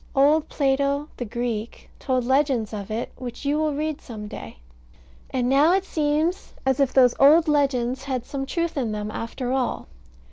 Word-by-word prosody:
Old 295 Hz, +3 st, +4 dB
Plato, 280 Hz, +1 st, 0 dB
the 245 Hz, -, -3 dB
Greek, 230 Hz, 0 st, -4 dB
told 255 Hz, -2 st, 0 dB
legends 265 Hz, -4 st, +1 dB
of 200 Hz, -2 st, -5 dB
it, 220 Hz, +2 st, -3 dB
which 250 Hz, +2 st, -7 dB
you 290 Hz, +2 st, +1 dB
will 305 Hz, -2 st, 0 dB
read 305 Hz, 0 st, -3 dB
some 215 Hz, -3 st, -8 dB
day; 205 Hz, -, -9 dB, 0.7 s
and 250 Hz, -2 st, -1 dB
now 285 Hz, +6 st, +5 dB
it 385 Hz, 0 st, +1 dB
seems 310 Hz, +3 st, -1 dB
as 265 Hz, +1 st, +1 dB
if 275 Hz, -2 st, +3 dB
those 250 Hz, -2 st, +5 dB
old 310 Hz, +4 st, +6 dB
legends 270 Hz, -3 st, +1 dB
had 255 Hz, -3 st, -3 dB
some 270 Hz, -1 st, -4 dB
truth 335 Hz, +1 st, -2 dB
in 235 Hz, -5 st, -1 dB
them, 210 Hz, 0 st, -4 dB
after 245 Hz, +3 st, -4 dB
all. 260 Hz, -2 st, -1 dB
270 Hz, 175 wpm, -24 LUFS, 245-295 Hz, 0.7 s, old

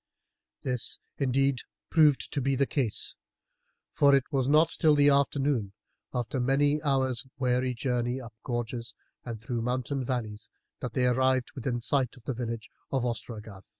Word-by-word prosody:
This, 125 Hz, -3 st, 0 dB, 0.2 s
indeed, 135 Hz, -1 st, +2 dB, 0.3 s
proved 150 Hz, -4 st, +4 dB
to 140 Hz, -, 0 dB
be 135 Hz, +1 st, +1 dB
the 140 Hz, +1 st, +3 dB
case, 130 Hz, -6 st, -1 dB, 0.7 s
for 140 Hz, -1 st, +5 dB
it 135 Hz, -, +3 dB
was 135 Hz, -2 st, +1 dB
not 155 Hz, +2 st, +5 dB
till 155 Hz, -2 st, +5 dB
the 145 Hz, 0 st, +5 dB
afternoon, 140 Hz, -6 st, +1 dB, 0.4 s
after 125 Hz, +1 st, -2 dB
many 145 Hz, +4 st, +2 dB
hours' 130 Hz, -3 st, +1 dB
weary 125 Hz, -1 st, +1 dB
journey 125 Hz, +1 st, -1 dB
up 120 Hz, -3 st, -10 dB
gorges 120 Hz, -2 st, -4 dB, 0.3 s
and 115 Hz, -3 st, -6 dB
through 115 Hz, +1 st, -3 dB
mountain 130 Hz, +3 st, -1 dB
valleys, 115 Hz, -5 st, -3 dB, 0.3 s
that 125 Hz, -3 st, -5 dB
they 125 Hz, +1 st, +2 dB
arrived 130 Hz, 0 st, +2 dB
within 125 Hz, -2 st, -2 dB
sight 130 Hz, 0 st, 0 dB
of 125 Hz, -, -17 dB
the 135 Hz, -, -2 dB
village 115 Hz, -2 st, -4 dB, 0.2 s
of 130 Hz, -3 st, 0 dB
Ostragarth. 110 Hz, -4 st, -6 dB
130 Hz, 150 wpm, -29 LUFS, 120-140 Hz, 0.7 s, for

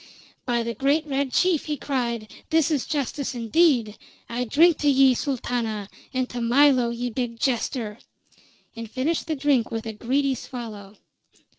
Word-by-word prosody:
"By 240 Hz, -1 st, +1 dB
the 235 Hz, 0 st, -3 dB
great 285 Hz, +5 st, +1 dB
Red 275 Hz, -2 st, -1 dB
Chief!" 360 Hz, -1 st, +2 dB
he 300 Hz, -1 st, -2 dB
cried. 235 Hz, -5 st, -3 dB, 0.2 s
"This 320 Hz, 0 st, +2 dB
is 285 Hz, -5 st, 0 dB
justice 280 Hz, -2 st, -2 dB
indeed! 235 Hz, -2 st, +2 dB, 0.3 s
I 245 Hz, +1 st, -2 dB
drink 320 Hz, +7 st, +4 dB
to 295 Hz, -, +2 dB
ye, 270 Hz, -1 st, +6 dB
Sultana, 235 Hz, -6 st, -2 dB, 0.2 s
and 255 Hz, -1 st, -1 dB
to 245 Hz, -, -5 dB
Milo, 250 Hz, 0 st, +4 dB
ye 240 Hz, +1 st, -3 dB
big 235 Hz, -1 st, -3 dB
jester!" 235 Hz, -4 st, -1 dB, 0.8 s
and 230 Hz, -1 st, -7 dB
finished 275 Hz, +8 st, -1 dB
the 315 Hz, -, -1 dB
drink 270 Hz, -4 st, +1 dB
with 225 Hz, 0 st, -4 dB
a 220 Hz, -, -4 dB
greedy 265 Hz, +5 st, 0 dB
swallow. 220 Hz, -5 st, -8 dB
250 Hz, 155 wpm, -24 LUFS, 230-285 Hz, 0.8 s, ye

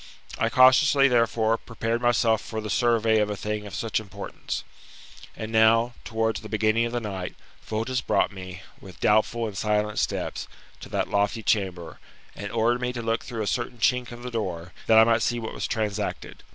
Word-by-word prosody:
I -, -, +2 dB
cautiously, 135 Hz, +2 st, +6 dB
therefore, 115 Hz, -2 st, +2 dB
prepared 115 Hz, +1 st, -3 dB
myself 115 Hz, -3 st, +3 dB
for 110 Hz, -, -5 dB
the 105 Hz, -1 st, -5 dB
survey 115 Hz, -2 st, +3 dB
of 105 Hz, 0 st, +1 dB
a 105 Hz, -, -2 dB
thing 105 Hz, +1 st, -4 dB
of 100 Hz, -, -8 dB
such 110 Hz, +1 st, -1 dB
importance. 105 Hz, -3 st, -6 dB, 0.7 s
And 110 Hz, 0 st, -5 dB
now, 115 Hz, +2 st, +4 dB
towards 110 Hz, -3 st, -1 dB
the 110 Hz, -, -9 dB
beginning 110 Hz, +1 st, +2 dB
of -, -, -7 dB
the 120 Hz, -, -1 dB
night, 95 Hz, -5 st, -5 dB, 0.3 s
Fotis 115 Hz, +3 st, -2 dB
brought -, -, +1 dB
me, 95 Hz, -1 st, -9 dB, 0.2 s
with 95 Hz, -2 st, -13 dB
doubtful 110 Hz, +2 st, +2 dB
and 105 Hz, -3 st, -5 dB
silent 105 Hz, 0 st, 0 dB
steps, -, -, -2 dB, 0.3 s
to -, -, -10 dB
that -, -, -1 dB
lofty 100 Hz, +2 st, 0 dB
chamber, 90 Hz, -6 st, -1 dB, 0.4 s
and 100 Hz, 0 st, -6 dB
ordered 120 Hz, +2 st, +1 dB
me 125 Hz, 0 st, -1 dB
to 120 Hz, -, -4 dB
look 115 Hz, 0 st, 0 dB
through 115 Hz, -3 st, -4 dB
a -, -, -3 dB
certain 120 Hz, +3 st, -2 dB
chink 125 Hz, +1 st, +1 dB
of 120 Hz, 0 st, -10 dB
the 125 Hz, -, -5 dB
door, 90 Hz, -6 st, -4 dB
that 110 Hz, -, +6 dB
I 110 Hz, -, +9 dB
might 115 Hz, 0 st, +3 dB
see 120 Hz, -, 0 dB
what 110 Hz, -, -5 dB
was -, -, -3 dB
transacted. 105 Hz, -2 st, -3 dB
110 Hz, 190 wpm, -25 LUFS, 105-120 Hz, 0.7 s, I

